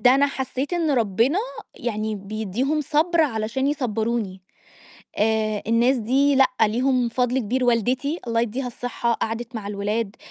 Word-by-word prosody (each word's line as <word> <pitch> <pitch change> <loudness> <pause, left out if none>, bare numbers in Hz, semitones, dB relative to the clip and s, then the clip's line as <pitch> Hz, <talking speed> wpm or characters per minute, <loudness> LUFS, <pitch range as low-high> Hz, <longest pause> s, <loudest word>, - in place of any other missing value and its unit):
ده 250 +3 +6
أنا 280 +1 +4
حسّيت 270 +2 -3
إن 335 -3 +1
ربنا 235 - +2 0.4
يعني 215 -2 -3
بيدّيهم 215 +9 -2
صَبْر 320 +4 +2
علشان 250 -2 0
يصبّروني. 225 -8 -1 0.8
آآ 215 -1 +1
الناس 235 +4 +3
دي 265 +5 +2
لأ 270 -1 +6
ليهم 245 +3 +2
فضل 250 +2 0
كبير، 250 +2 0
والدتي 250 - +1
الله 230 0 +1
يدّيها 240 +3 -2
الصحة، 245 -1 -2
قعدت 230 +2 -3
مع 220 -3 -5
الولاد، 205 +1 -2
240 Hz, 140 wpm, -23 LUFS, 220-265 Hz, 0.8 s, ده